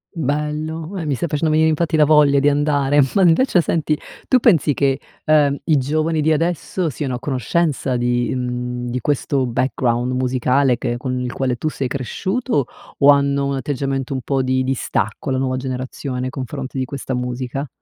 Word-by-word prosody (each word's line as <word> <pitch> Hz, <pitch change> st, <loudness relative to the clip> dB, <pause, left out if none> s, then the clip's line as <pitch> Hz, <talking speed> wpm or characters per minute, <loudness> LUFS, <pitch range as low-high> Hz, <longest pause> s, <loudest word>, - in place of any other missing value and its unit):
Bello, 155 Hz, +4 st, -3 dB
e 165 Hz, -, -4 dB
mi 145 Hz, -, 0 dB
stai 170 Hz, +6 st, -2 dB
facendo 155 Hz, +2 st, 0 dB
venire 160 Hz, +1 st, +4 dB
infatti 160 Hz, +1 st, 0 dB
la 155 Hz, -, +5 dB
voglia 145 Hz, -2 st, +5 dB
di 145 Hz, +1 st, +4 dB
andare, 145 Hz, -1 st, +2 dB
ma 195 Hz, -, +3 dB
invece 180 Hz, +2 st, +4 dB
senti, 155 Hz, -1 st, 0 dB, 0.3 s
tu 255 Hz, -, +4 dB
pensi 170 Hz, -, +4 dB
che, 135 Hz, -1 st, +1 dB, 0.3 s
ehm, 145 Hz, -2 st, +3 dB
i 155 Hz, -3 st, +3 dB
giovani 155 Hz, +4 st, 0 dB
di 160 Hz, -, +2 dB
adesso, 170 Hz, +2 st, -1 dB
siano 140 Hz, -1 st, -4 dB
a 125 Hz, -, -3 dB
conoscenza 135 Hz, +1 st, -1 dB
di, 120 Hz, 0 st, 0 dB
mhmm, 125 Hz, 0 st, -3 dB
di 125 Hz, +1 st, -2 dB
questo 140 Hz, 0 st, 0 dB
background 125 Hz, 0 st, 0 dB
musicale 130 Hz, 0 st, +1 dB
che 120 Hz, -, -2 dB
con 130 Hz, 0 st, -3 dB
il 125 Hz, -1 st, -3 dB
quale 130 Hz, -2 st, -1 dB
tu 155 Hz, -, -1 dB
sei 135 Hz, -4 st, -3 dB
cresciuto, 185 Hz, -, -1 dB, 0.3 s
o 140 Hz, -, +5 dB
hanno 140 Hz, 0 st, +3 dB
un 140 Hz, -, -1 dB
atteggiamento 135 Hz, -1 st, -2 dB
un 130 Hz, -, -3 dB
po' 135 Hz, 0 st, 0 dB
di 130 Hz, 0 st, +1 dB
distacco, 130 Hz, -4 st, -2 dB
la 130 Hz, -, 0 dB
nuova 130 Hz, -1 st, -1 dB
generazione 130 Hz, 0 st, -4 dB
nei 130 Hz, -, -2 dB
confronti 135 Hz, 0 st, -5 dB
di 130 Hz, -, 0 dB
questa 135 Hz, 0 st, -5 dB
musica? 125 Hz, +2 st, -3 dB
140 Hz, 180 wpm, -20 LUFS, 130-155 Hz, 0.3 s, la